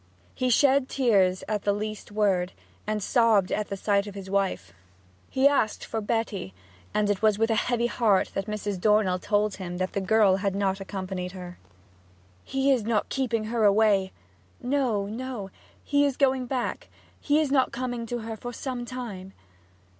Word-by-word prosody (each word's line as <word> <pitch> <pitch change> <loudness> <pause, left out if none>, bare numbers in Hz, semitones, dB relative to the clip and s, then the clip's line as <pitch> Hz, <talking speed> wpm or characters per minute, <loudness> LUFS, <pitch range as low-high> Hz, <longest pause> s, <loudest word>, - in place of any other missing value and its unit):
He 255 -1 -1
shed 270 +1 +4
tears 195 -8 +2
at 210 -1 -1
the 205 - +1
least 215 +1 -5
word, 195 -4 +1 0.3
and 215 -1 -1
sobbed 225 -6 +3
at 210 - -1
the 200 - -5
sight 200 +1 +1
of 205 - -8
his 190 -1 -8
wife. 190 - -1 0.6
He 265 +1 +4
asked 275 -7 +1
for 225 - -3
Betty, 205 - -2 0.4
and 210 -1 +1
it 205 -1 0
was 215 -2 +3
with 225 +1 +1
a - - +3
heavy 240 -1 +1
heart 220 -5 +2
that 195 +1 -3
Mrs. 205 -3 -3
Dornell 210 -3 +3
told 205 +1 0
him 180 -2 -5
that 185 0 -2
the 200 - -1
girl 200 -1 +4
had 195 -1 -1
not 195 -1 0
accompanied 190 -2 -5
her. 180 -1 -9 0.8
'He 270 +1 +1
is 260 -3 +3
not 215 -1 0
keeping 240 -5 -1
her 225 +1 -1
away?' 200 -2 +4 0.5
'No, 250 -6 0
no. 220 -2 -5 0.3
He 285 0 +2
is 280 -3 0
going 265 -3 +2
back 250 -1 -3 0.3
he 295 +1 +2
is 300 -3 0
not 265 -2 +3
coming 245 -2 -4
to 240 0 -3
her 225 0 -5
for 245 +3 -7
some 245 0 -5
time.' 215 -7 -7
215 Hz, 175 wpm, -26 LUFS, 195-245 Hz, 0.8 s, shed